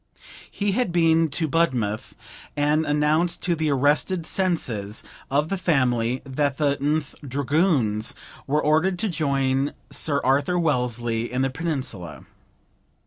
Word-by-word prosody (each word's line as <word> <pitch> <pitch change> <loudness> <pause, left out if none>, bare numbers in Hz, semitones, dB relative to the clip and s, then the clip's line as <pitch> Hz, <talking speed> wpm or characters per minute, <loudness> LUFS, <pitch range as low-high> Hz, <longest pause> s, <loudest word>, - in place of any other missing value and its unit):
He 205 0 -1
had 220 -2 0
been 165 -1 +3
to 160 +3 -1
Budmouth, 125 -9 0 0.4
and 150 +2 +2
announced 150 +4 +1
to 175 - +2
the 160 -1 0
arrested 145 +5 +1
senses 120 - -1 0.3
of 145 +3 +1
the 195 - -2
family 125 -7 +1
that 140 0 -1
the 145 -2 +2
th 150 +1 -1
Dragoons 140 - 0 0.3
were 150 +2 +1
ordered 160 +5 +2
to 215 +3 0
join 140 -4 0 0.2
Sir 145 -3 0
Arthur 140 +7 +2
Wellesley 120 -7 0
in 125 +1 0
the 135 - 0
Peninsula. 130 - -4
145 Hz, 130 wpm, -24 LUFS, 130-165 Hz, 0.4 s, been